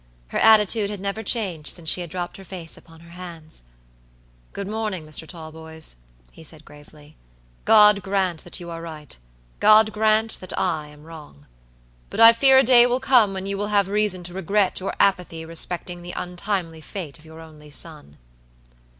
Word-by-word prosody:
Her -, -, -2 dB
attitude 215 Hz, -1 st, +4 dB
had 205 Hz, -1 st, -6 dB
never 200 Hz, +3 st, -4 dB
changed 190 Hz, -8 st, -2 dB
since 170 Hz, -3 st, -13 dB
she 180 Hz, -, +1 dB
had 175 Hz, -, -7 dB
dropped 175 Hz, +1 st, -5 dB
her 195 Hz, -, -12 dB
face 175 Hz, -3 st, -8 dB
upon 165 Hz, 0 st, -16 dB
her 170 Hz, 0 st, -16 dB
hands. 170 Hz, -, -10 dB, 0.9 s
"Good 200 Hz, -, -6 dB
morning, 210 Hz, -6 st, -4 dB
Mr. 155 Hz, +1 st, -4 dB
Talboys," 160 Hz, -, -8 dB, 0.3 s
he -, -, -15 dB
said, 155 Hz, -1 st, -12 dB
gravely. 150 Hz, 0 st, -17 dB, 0.5 s
"God 210 Hz, -2 st, +6 dB
grant 190 Hz, -4 st, -1 dB
that 175 Hz, -, -6 dB
you 170 Hz, -1 st, -8 dB
are 165 Hz, 0 st, -7 dB
right. 155 Hz, -, -9 dB, 0.4 s
God 215 Hz, 0 st, +5 dB
grant 220 Hz, +1 st, +1 dB
that 185 Hz, -, -6 dB
I 160 Hz, -5 st, -1 dB
am 150 Hz, 0 st, -16 dB
wrong. 150 Hz, -, -13 dB, 0.6 s
But -, -, -6 dB
I 230 Hz, 0 st, +9 dB
fear 265 Hz, +3 st, +5 dB
a 265 Hz, -, +6 dB
day 245 Hz, -1 st, +6 dB
will 245 Hz, +1 st, 0 dB
come 255 Hz, -6 st, +4 dB
when 190 Hz, 0 st, -5 dB
you 200 Hz, 0 st, -3 dB
will 205 Hz, -, -2 dB
have 205 Hz, -2 st, +2 dB
reason 205 Hz, -3 st, +1 dB
to 175 Hz, 0 st, -7 dB
regret 190 Hz, +1 st, 0 dB
your 190 Hz, -, -4 dB
apathy 180 Hz, -4 st, 0 dB
respecting 175 Hz, +1 st, -2 dB
the 175 Hz, 0 st, -8 dB
untimely 180 Hz, -2 st, -4 dB
fate 165 Hz, -3 st, -8 dB
of 155 Hz, -, -19 dB
your 160 Hz, 0 st, -13 dB
only 155 Hz, -2 st, -14 dB
son." 150 Hz, -, -5 dB
180 Hz, 180 wpm, -22 LUFS, 160-205 Hz, 0.9 s, I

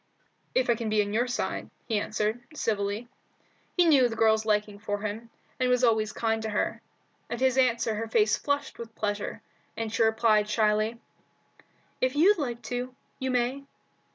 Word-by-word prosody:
"If 255 Hz, -, +3 dB
I 240 Hz, -, +5 dB
can 230 Hz, -1 st, -3 dB
be 215 Hz, -1 st, +3 dB
on 205 Hz, 0 st, -5 dB
your 240 Hz, +3 st, +2 dB
side," 245 Hz, -, -3 dB, 0.2 s
he 220 Hz, -3 st, +1 dB
answered, 215 Hz, +3 st, -1 dB
civilly. 210 Hz, -2 st, -1 dB, 0.7 s
He 355 Hz, -, +5 dB
knew 275 Hz, -7 st, +5 dB
the 225 Hz, -, -5 dB
girl's 220 Hz, -1 st, +3 dB
liking 210 Hz, -1 st, 0 dB
for 205 Hz, 0 st, -3 dB
him, 215 Hz, +2 st, -5 dB, 0.3 s
and 255 Hz, -1 st, +2 dB
was 250 Hz, 0 st, +2 dB
always 220 Hz, -3 st, +3 dB
kind 225 Hz, 0 st, -1 dB
to 220 Hz, -, -3 dB
her. 210 Hz, -, -1 dB, 0.5 s
At 235 Hz, -, -3 dB
his 260 Hz, -1 st, +3 dB
answer 240 Hz, -4 st, +2 dB
her 225 Hz, +2 st, -3 dB
face 220 Hz, -1 st, +3 dB
flushed 285 Hz, 0 st, -2 dB
with 225 Hz, -1 st, -8 dB
pleasure, 205 Hz, -1 st, -3 dB, 0.3 s
and 225 Hz, -1 st, -3 dB
she 225 Hz, -, 0 dB
replied 220 Hz, -1 st, +3 dB
shyly 215 Hz, +1 st, +1 dB, 1.0 s
"If 255 Hz, +2 st, +1 dB
you'd 370 Hz, +6 st, +5 dB
like 240 Hz, -5 st, -3 dB
to, 250 Hz, +1 st, -4 dB, 0.2 s
you 260 Hz, -1 st, -2 dB
may." 255 Hz, +2 st, 0 dB
225 Hz, 175 wpm, -28 LUFS, 215-250 Hz, 1.0 s, I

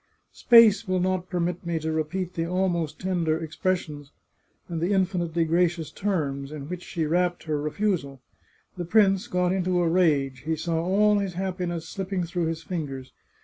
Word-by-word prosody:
Space 230 Hz, -3 st, +6 dB
will 185 Hz, 0 st, +1 dB
not 185 Hz, 0 st, -1 dB
permit 175 Hz, -1 st, -2 dB
me 170 Hz, -1 st, -2 dB
to 160 Hz, 0 st, -2 dB
repeat 175 Hz, +4 st, -2 dB
the 165 Hz, 0 st, -2 dB
almost 175 Hz, -4 st, -1 dB
tender 170 Hz, -4 st, 0 dB
ex 155 Hz, 0 st, -8 dB
pressions, 155 Hz, -6 st, -2 dB, 0.6 s
and 165 Hz, -2 st, -4 dB
the 180 Hz, +4 st, +1 dB
infinitely 175 Hz, -3 st, +1 dB
gracious 170 Hz, 0 st, +1 dB
terms, 145 Hz, -8 st, -2 dB
in 145 Hz, -2 st, -7 dB
which 180 Hz, +1 st, -5 dB
she 165 Hz, -3 st, -3 dB
wrapped 175 Hz, +3 st, 0 dB
her 150 Hz, -2 st, -2 dB
refusal. 150 Hz, -4 st, -1 dB, 0.6 s
The 175 Hz, -, -3 dB
prince 195 Hz, +2 st, +3 dB
got 180 Hz, -4 st, +1 dB
into 185 Hz, -1 st, +1 dB
a 175 Hz, -, +2 dB
rage; 150 Hz, -7 st, +2 dB
he 160 Hz, +4 st, -2 dB
saw 165 Hz, +1 st, -1 dB
all 205 Hz, +3 st, +3 dB
his 195 Hz, -3 st, -3 dB
happiness 180 Hz, -3 st, -3 dB
slipping 190 Hz, -1 st, -3 dB
through 175 Hz, 0 st, -2 dB
his 165 Hz, 0 st, -4 dB
fingers. 140 Hz, -8 st, -5 dB
175 Hz, 170 wpm, -26 LUFS, 160-185 Hz, 0.6 s, Space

